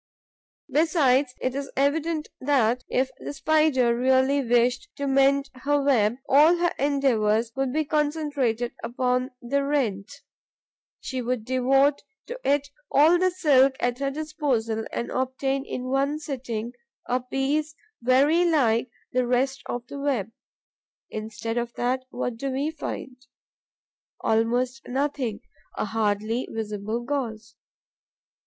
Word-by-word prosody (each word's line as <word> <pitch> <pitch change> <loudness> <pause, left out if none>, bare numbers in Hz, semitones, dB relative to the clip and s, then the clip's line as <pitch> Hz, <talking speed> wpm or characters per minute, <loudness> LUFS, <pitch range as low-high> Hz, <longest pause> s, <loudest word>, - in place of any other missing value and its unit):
Besides, 280 -4 +3
it 255 - -1
is 275 0 -4
evident 305 +3 0
that, 250 -3 +2
if 260 +1 +1
the - - -6
Spider 285 -5 +2
really 260 +3 +3
wished 245 +1 +2
to 280 - -3
mend 275 0 +3
her 290 +3 0
web, 240 -6 +3
all 295 +5 +6
her 345 0 +1
endeavours 235 -6 +2
would 270 -1 -1
be 310 +3 0
concentrated 290 -6 0
upon 250 +2 0
the 280 +4 0
rent. 235 -9 -1 0.9
She 260 -2 -4
would 245 -2 -2
devote 270 +3 +3 0.2
to - - -7
it 285 0 +1 0.2
all 320 +5 +5
the 370 +1 +3
silk 280 -7 +4
at 245 +1 -1
her 275 0 0
disposal 275 -7 -2
and 235 - -3
obtain 265 +1 -1
in 250 - -4
one 275 +2 +1
sitting 245 -6 -5 0.3
a 250 +1 +1
piece 280 +4 -1 0.3
very 275 +8 +4
like 255 -8 +2 0.2
the 250 -1 +1
rest 265 +3 +1
of 245 0 -4
the 280 - -8
web. 255 -7 -1 0.8
Instead 220 +2 -4
of 235 0 -4
that, 255 +2 -1
what 245 -2 -3
do 275 +3 -3
we 275 +4 -1
find? 280 -4 -6 1.0
Almost 245 +4 0
nothing: 260 -4 -2 0.4
a - - 0
hardly 215 +2 -1
visible 215 +1 -3
gauze. 240 -4 -4
260 Hz, 130 wpm, -25 LUFS, 240-285 Hz, 1.0 s, all